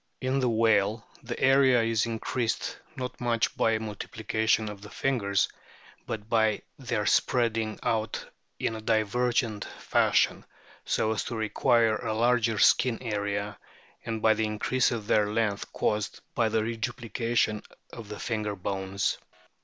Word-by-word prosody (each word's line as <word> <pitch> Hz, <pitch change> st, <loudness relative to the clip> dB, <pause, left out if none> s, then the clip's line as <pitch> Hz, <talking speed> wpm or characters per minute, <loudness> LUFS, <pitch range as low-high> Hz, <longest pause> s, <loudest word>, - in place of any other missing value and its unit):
In 130 Hz, +1 st, 0 dB
the 125 Hz, -2 st, +2 dB
whale 110 Hz, -1 st, +2 dB, 0.2 s
the 120 Hz, 0 st, -6 dB
area 130 Hz, -3 st, +5 dB
is 115 Hz, 0 st, +1 dB
increased, 115 Hz, +1 st, -2 dB, 0.2 s
not 125 Hz, -1 st, -6 dB
much 115 Hz, -2 st, +1 dB
by 115 Hz, -, +2 dB
a 110 Hz, -, +1 dB
multiplication 110 Hz, +1 st, -1 dB
of 105 Hz, -1 st, -7 dB
the 105 Hz, -, -10 dB
fingers, 105 Hz, -8 st, +1 dB, 0.6 s
but 110 Hz, -1 st, -5 dB
by 110 Hz, -2 st, +2 dB, 0.2 s
their -, -, -2 dB
spreading 115 Hz, -3 st, +1 dB
out 110 Hz, -1 st, -1 dB, 0.3 s
in 115 Hz, -, -1 dB
a 110 Hz, -, -6 dB
divergent 115 Hz, +1 st, +1 dB
fashion, -, -, +2 dB, 0.4 s
so 110 Hz, -, +1 dB
as 110 Hz, -, -2 dB
to 120 Hz, -, -4 dB
require 110 Hz, +1 st, +2 dB
a 110 Hz, -, -3 dB
larger 120 Hz, -1 st, +2 dB
skin 120 Hz, +3 st, +4 dB
area, 105 Hz, -2 st, -2 dB, 0.4 s
and 110 Hz, -2 st, -4 dB
by 110 Hz, -, +6 dB
the 110 Hz, 0 st, 0 dB
increase 110 Hz, +4 st, +1 dB
of 115 Hz, -4 st, -3 dB
their 105 Hz, -1 st, +3 dB
length 105 Hz, -2 st, -1 dB
caused 105 Hz, -1 st, -1 dB
by 115 Hz, -2 st, +2 dB
the 110 Hz, 0 st, +1 dB
reduplication 115 Hz, -1 st, -1 dB, 0.3 s
of 115 Hz, -3 st, -9 dB
the 105 Hz, -, -6 dB
finger 105 Hz, -3 st, -2 dB
bones. 95 Hz, +1 st, -2 dB
110 Hz, 145 wpm, -28 LUFS, 105-120 Hz, 0.6 s, by